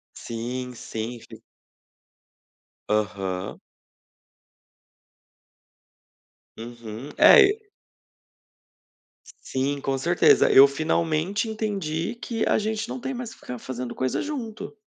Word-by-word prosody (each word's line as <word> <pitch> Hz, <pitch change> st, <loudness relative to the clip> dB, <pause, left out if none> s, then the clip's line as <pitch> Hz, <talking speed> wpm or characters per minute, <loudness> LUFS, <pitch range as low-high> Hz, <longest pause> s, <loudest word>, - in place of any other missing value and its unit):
Sim, 125 Hz, +2 st, -5 dB
sim, 115 Hz, +1 st, -5 dB
f -, -, -14 dB, 1.5 s
Aham. 100 Hz, -2 st, -2 dB, 3.0 s
Uhum, 115 Hz, +2 st, -8 dB
é 470 Hz, -, +9 dB
e 425 Hz, 0 st, -5 dB, 1.7 s
Sim, 140 Hz, +2 st, -2 dB
com 135 Hz, 0 st, -1 dB
certeza. 170 Hz, +6 st, +4 dB
Eu 135 Hz, -, +9 dB
finalmente 160 Hz, +7 st, -1 dB
entendi 200 Hz, -3 st, -3 dB
que 230 Hz, -1 st, -3 dB
a -, -, +3 dB
gente 220 Hz, 0 st, -2 dB
não 260 Hz, -, -5 dB
tem 265 Hz, +2 st, -4 dB
mais 245 Hz, -2 st, -6 dB
que -, -, -20 dB
ficar 125 Hz, -1 st, -7 dB
fazendo 125 Hz, 0 st, -6 dB
coisa 130 Hz, -1 st, -1 dB
junto. 245 Hz, -8 st, -6 dB
145 Hz, 95 wpm, -25 LUFS, -, 3.0 s, é